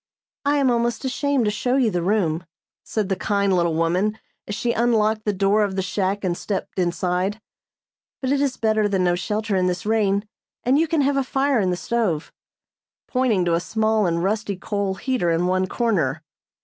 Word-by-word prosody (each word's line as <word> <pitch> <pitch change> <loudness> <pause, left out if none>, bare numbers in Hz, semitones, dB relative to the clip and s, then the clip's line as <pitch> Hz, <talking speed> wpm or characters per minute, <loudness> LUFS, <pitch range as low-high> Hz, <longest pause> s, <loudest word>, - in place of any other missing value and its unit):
"I 290 +1 +3
am 270 -3 +3
almost 235 +2 0
ashamed 270 -1 0
to 210 - +2
show 245 +5 0
you 250 -5 +3
the 175 - -1
room," 175 -3 +1 0.4
said 215 -3 -2
the 190 - 0
kind 200 -1 +1
little 170 -2 +1
woman, 180 +6 +1 0.3
as 205 - -3
she 235 +2 0
unlocked 220 -2 +1
the 210 - +2
door 200 +2 +2
of 195 -2 -2
the 190 - 0
shack 195 +2 -1
and 180 -2 0
stepped 195 0 -4
inside, 180 +3 0 0.8
"but 260 -1 -1
it 280 0 +2
is 275 -2 0
better 215 -1 +2
than 190 -2 +1
no 175 -1 +3
shelter 210 +4 -1
in 185 -1 +2
this 180 +1 -2
rain, 210 -1 +1 0.4
and 260 +4 +3
you 325 - +2
can 315 -1 +1
have 280 0 +2
a 275 - +2
fire 270 0 +1
in 190 -3 +1
the 180 - -1
stove," 200 -9 -1 0.7
pointing 245 -8 +1
to 170 - +1
a 165 - +3
small 215 +3 +1
and 170 0 0
rusty 205 +1 -1
coal 200 0 -2
heater 245 -4 -1
in 165 +1 +1
one 185 +1 +1
corner. 225 -4 0
205 Hz, 200 wpm, -22 LUFS, 185-235 Hz, 0.8 s, I